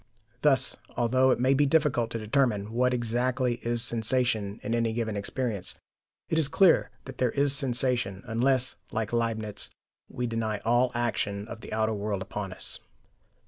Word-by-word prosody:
Thus, 135 -3 +4 0.2
although 130 +2 +3
it 130 - +2
may 130 +2 +3
be 145 +1 +3
difficult 135 -6 +2
to 115 - -4
determine 110 -2 0
what 125 +2 +2
exactly 125 +1 0
is 120 0 0
sensation 115 -3 0
in 115 - -2
any 115 -1 +1
given 110 -2 -2
experience, 105 -1 -2 0.5
it 160 - +1
is 155 - +2
clear 185 +3 +4 0.2
that 135 -1 -10
there 125 - +3
is 140 +2 +2
sensation, 125 -7 0
unless, 125 +3 +1
like 110 -1 -3
Leibniz, 110 -3 -1 0.4
we 125 - -3
deny 115 -2 -2
all 120 +2 +3
action 105 -4 -1
of 115 -1 -8
the - - -10
outer 110 0 0
world 100 -2 -2
upon 95 0 -5
us. 90 - -6
120 Hz, 160 wpm, -28 LUFS, 110-130 Hz, 0.5 s, Thus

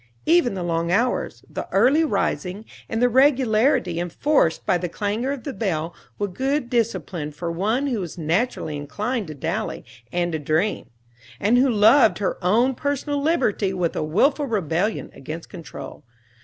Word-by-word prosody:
Even 320 - +3
the 185 - -3
long 170 0 -1
hours, 235 +6 0
the - - -6
early 260 +11 +4
rising 200 - -1 0.2
and 225 - -1
the - - +6
regularity 245 - +3
enforced 175 - +1
by - - +3
the 175 0 -2
clangor 215 +8 -2
of 280 -3 -5
the 280 - -4
bell 170 -8 -2 0.2
were 205 - -1
good 265 +7 -2
discipline 205 -9 -1
for 170 +3 -4
one 215 +11 0
who 250 -6 -1
was 180 -2 -6
naturally 165 0 -1
inclined 210 - -3
to 155 - -7
dally 165 +10 -3 0.3
and 175 0 0
to 160 - -2
dream, 155 +8 -1 0.5
and 230 +5 +3
who 265 +1 +4
loved 225 +2 +5
her 195 -2 -2
own 235 +9 +3
personal 285 +2 -2
liberty 220 - +1
with 175 -2 -1
a - - -1
willful 275 - +2
rebellion 200 - -1
against 155 +5 -8
control. 170 -5 -9
210 Hz, 160 wpm, -23 LUFS, 170-255 Hz, 0.5 s, the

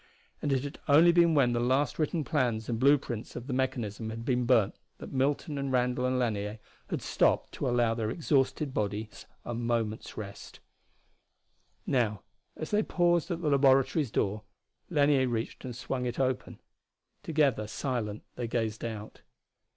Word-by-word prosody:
And 145 - -1
it 135 -1 +1
had 145 - -7
only 160 +4 +7
been 170 -1 +4
when 125 -4 +4
the 120 - +1
last 130 +6 +1
written 155 +1 0
plans 125 -7 0
and 115 -2 -2
blue 140 +3 +6
prints 120 -5 -6
of 120 - -6
the 130 - -4
mechanism 115 -4 -2
had 115 +1 -6
been 125 -2 +1
burned 115 -6 +4 0.2
that - - -9
Milton 140 +2 0
and 140 -1 -2
Randall 125 0 +1
and 130 0 0
Lanier 105 -3 -1 0.3
had - - -3
stopped - - +2
to - - -2
allow 120 -2 +2
their 110 -2 -2
exhausted 140 0 0
bodies 105 0 -3 0.2
a 120 - -3
moment 115 -2 -1
of - - -14
rest. 100 -2 -8 1.3
Now 110 -6 0 0.3
as 155 - -5
they 210 0 +3
paused 175 -4 +1
at 175 -1 -3
the 150 - +2
laboratory's 135 +1 +4
door, 105 0 -1 0.5
Lanier 145 -4 +3
reached 115 -1 -3
and 125 -2 -5
swung 125 +1 -3
it 120 - -4
open. 130 -1 -1 0.6
Together, 145 -9 +1
silent, 110 -3 -3
they 120 - -4
gazed 110 -2 -2
out. 110 -2 -6
125 Hz, 165 wpm, -29 LUFS, 115-140 Hz, 1.3 s, only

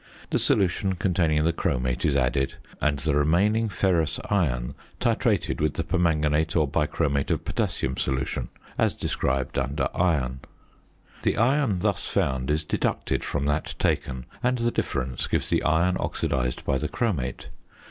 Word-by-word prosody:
The - - +2
solution 95 0 +1
containing 85 -4 +1
the 85 +1 +2
chromate 65 -3 -1
is 70 - +2
added, 65 +1 +1 0.3
and 75 -1 +2
the 75 +1 0
remaining 95 +10 +3
ferrous 90 -6 +1
iron 70 -10 +1 0.3
titrated - - +1
with 75 -1 +1
the 80 - -1
permanganate 80 -3 +1
or 80 -3 +3
bichromate 70 -1 0
of - - -1
potassium 65 0 -1
solution, 65 -1 -1 0.3
as - - +2
described 65 0 -1
under 70 +3 -1
Iron. 70 -8 +1 0.8
The - - +1
iron 120 -5 +2
thus - - 0
found 65 -1 0
is 75 +1 +1
deducted - - -1
from 70 -1 -2
that 75 +2 -1
taken, 65 -1 -1 0.2
and 125 0 +2
the 120 0 +1
difference 65 - -2
gives - - -1
the - - +2
iron 85 +4 +2
oxidised 60 -1 -1
by 65 - +1
the - - -2
chromate. 85 - -2
75 Hz, 145 wpm, -26 LUFS, 65-90 Hz, 0.8 s, remaining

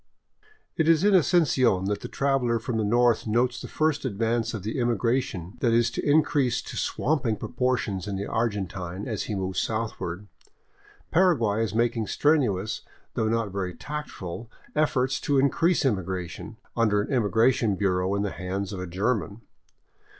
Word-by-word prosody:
It 160 0 +2
is 165 +1 +4
in 205 0 +4
Asuncion 140 - +3
that 100 +1 -1
the - - -5
traveler 135 -4 +1
from 115 +1 -3
the - - +1
north 120 +2 +2
notes 120 +3 +1
the - - -6
first 155 -1 0
advance 115 -1 -1
of 100 - -6
the 110 +5 -3
immigration 120 -5 -1
that 120 -2 +2
is 115 0 +3
to - - -4
increase 145 -3 +2
to - - -8
swamping 125 -7 0
propor 125 +3 0
tions 100 -3 -4
in 100 - -3
the 100 +1 -3
Argentine, 95 -4 -3
as 110 -4 -3
he 105 - -3
moves 95 -1 -2
southward. 105 -4 -3 0.9
Paraguay 135 - +3
is 110 - -3
making 115 -1 +1
strenuous, 120 -10 +1 0.3
though 110 - 0
not 115 -2 0
very 95 -2 -3
tactful, 120 - -6 0.3
efforts 135 -4 +1
to 145 - +1
increase 160 +5 +2
immigration, 95 -7 -3 0.2
under 105 -3 +2
an - - -4
immigration 115 -1 +2
bureau 95 0 0
in 100 - 0
the 100 - -2
hands 95 +2 -4
of 95 - -5
a 90 - -4
German. 105 +3 -1
115 Hz, 160 wpm, -26 LUFS, 100-130 Hz, 0.9 s, is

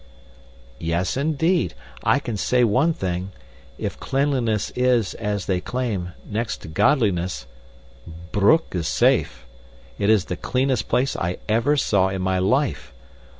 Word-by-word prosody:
"Yes, 85 +2 -1
indeed. 160 +5 +1 0.3
I - - +4
can 120 -5 -4
say 125 +6 +2
one 125 +9 +3
thing 95 - -3 0.4
if - - -4
cleanliness 130 -6 0
is, 125 -4 +1
as 105 -3 -3
they 90 -2 0
claim, 105 -6 -3
next 110 +2 -3
to - - -8
godliness, 90 - +1 0.9
Broek 105 +12 +3
is 85 -3 -2
safe. 65 0 +1 0.5
It 100 0 +1
is 110 -4 +4
the 90 - -4
cleanest 130 -2 0
place 135 +2 +1
I 85 +1 -2
ever 115 +7 +2
saw 100 -8 +2
in 95 -1 -3
my 95 0 +1
life. 130 - 0
110 Hz, 135 wpm, -23 LUFS, 95-130 Hz, 0.9 s, I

